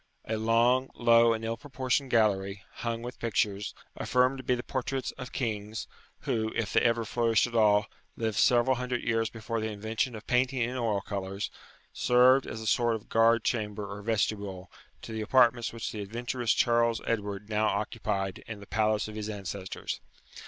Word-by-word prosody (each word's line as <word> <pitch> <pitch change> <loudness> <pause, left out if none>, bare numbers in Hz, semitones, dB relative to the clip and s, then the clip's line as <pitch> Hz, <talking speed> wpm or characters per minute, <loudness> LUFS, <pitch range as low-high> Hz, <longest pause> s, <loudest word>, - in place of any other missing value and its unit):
A 110 - -2
long, 115 +4 +3
low, 115 -1 +5
and 115 0 -2
ill 115 0 -2
proportioned 130 0 -1
gallery, 100 -4 +1
hung 115 0 -3
with 125 +1 -7
pictures, 105 -3 -1 0.2
affirmed 125 +2 +2
to - - -7
be 125 - +2
the 120 - -5
portraits 130 0 -3
of 125 -1 -9
kings, 110 -3 -3 0.4
who, 110 -1 -1
if 110 -2 -2
they - - +4
ever 115 -1 +2
flourished 115 0 +2
at 120 - -7
all, 105 -2 +4 0.3
lived 110 -2 -1
several 125 +1 +4
hundred 125 -1 -2
years 115 -1 +1
before 115 +1 -4
the 110 - -2
invention 110 +4 -2
of 110 - -9
painting 130 +1 +1
in 125 +2 -2
oil 110 -5 0
colours, 100 0 -4 0.4
served 125 +2 +4
as 110 - -6
a - - -6
sort 120 +2 +2
of 110 - -9
guard 115 0 +4
chamber 105 -3 -2
or 100 0 -7
vestibule 100 -3 -2 0.3
to - - -7
the 110 0 -3
apartments 120 0 +3
which 115 -1 -5
the 105 - -5
adventurous 120 +3 -2
Charles 115 -1 +3
Edward 105 -3 -2
now 110 0 +1
occupied 95 -1 -2
in 110 -2 -6
the 100 - -11
palace 110 0 +1
of 110 - -8
his 105 0 -4
ancestors. 100 -2 -5
115 Hz, 180 wpm, -29 LUFS, 105-120 Hz, 0.4 s, low